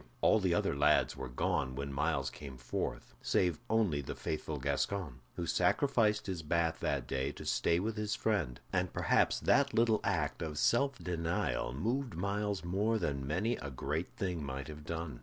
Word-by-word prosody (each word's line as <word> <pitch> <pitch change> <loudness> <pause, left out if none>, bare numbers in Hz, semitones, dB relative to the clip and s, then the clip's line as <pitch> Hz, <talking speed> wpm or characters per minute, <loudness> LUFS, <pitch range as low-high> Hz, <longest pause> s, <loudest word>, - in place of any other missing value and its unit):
All 110 - +5
the 95 -3 +2
other - - +1
lads 75 +2 +3
were 65 -1 -6
gone 65 +1 0
when 70 0 -4
Myles 70 -1 0
came 70 -3 -9
forth, - - -4
save 90 +1 +1
only 105 -10 +2
the 70 - -6
faithful 80 -1 -3
Gascoyne, 70 +2 -1 0.2
who - - -3
sacrificed 110 -7 +2
his 95 -4 -3
bath 80 +1 0
that - - -1
day 65 +1 -1
to - - -9
stay 85 0 +2
with 110 +3 -2
his 105 -1 -1
friend; 85 - 0
and 90 -1 +1
perhaps - - +2
that 140 -4 +3
little 115 -2 +4
act 85 -7 0
of 80 -3 -4
self 135 - +3
denial 85 - -1
moved 120 - -1
Myles 100 +2 -1
more 100 +6 +1
than 70 -8 -2
many 100 - 0
a 70 - -6
great 75 +6 -2
thing 90 -5 -2
might 70 +1 -5
have 75 -1 -9
done. 80 -6 -4
85 Hz, 175 wpm, -33 LUFS, 70-105 Hz, 0.2 s, All